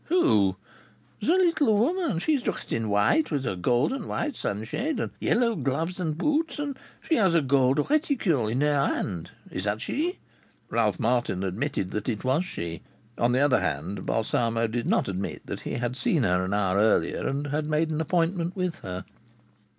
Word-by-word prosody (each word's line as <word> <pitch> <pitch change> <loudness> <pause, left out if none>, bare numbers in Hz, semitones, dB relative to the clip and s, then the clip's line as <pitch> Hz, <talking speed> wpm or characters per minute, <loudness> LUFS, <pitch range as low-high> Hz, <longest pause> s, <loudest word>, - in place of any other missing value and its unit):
"Who?" 105 - +3 0.7
"The - - -3
little 310 - +3
woman. 300 - +1
She 310 - +1
is 280 - +1
dressed - - -3
in 115 -1 -1
white, 105 - +3
with 140 -4 -1
a 95 - -1
gold 120 - +1
and 270 - -5
white 295 -4 -2
sunshade, 120 - -2
and - - -2
yellow 230 -1 +2
gloves 160 +6 -2
and 160 -4 -2
boots, 300 - 0
and 290 -2 -3 0.3
she 320 - +1
has 190 -6 +3
a 165 - +5
gold 135 +1 +3
reticule 250 - +1
in 120 +5 0
her 145 -2 +3
hand. 90 -3 -3 0.2
Is 90 - -4
that 105 +1 0
she?" 330 - -2 0.5
Ralph - - +1
Martin 120 -6 0
admitted 95 +1 -2
that 105 +3 -2
it 110 -4 -3
was 135 +8 +1
she. 85 - -5 0.4
On 120 +1 +3
the 130 +2 +2
other 145 -4 +4
hand, 85 +2 -3
Balsamo 115 +1 +1
did 115 +1 -2
not - - +2
admit 95 0 -4
that - - -5
he - - -5
had 120 +1 -2
seen 130 +3 +1
her 90 -2 +2
an 95 - -2
hour 95 -2 +1
earlier 105 -6 +2
and 140 +2 -2
had 150 +1 -2
made 155 +1 +1
an 155 0 -1
appointment 170 +2 0
with 180 -3 -2
her. 90 0 -6
140 Hz, 190 wpm, -26 LUFS, -, 0.7 s, a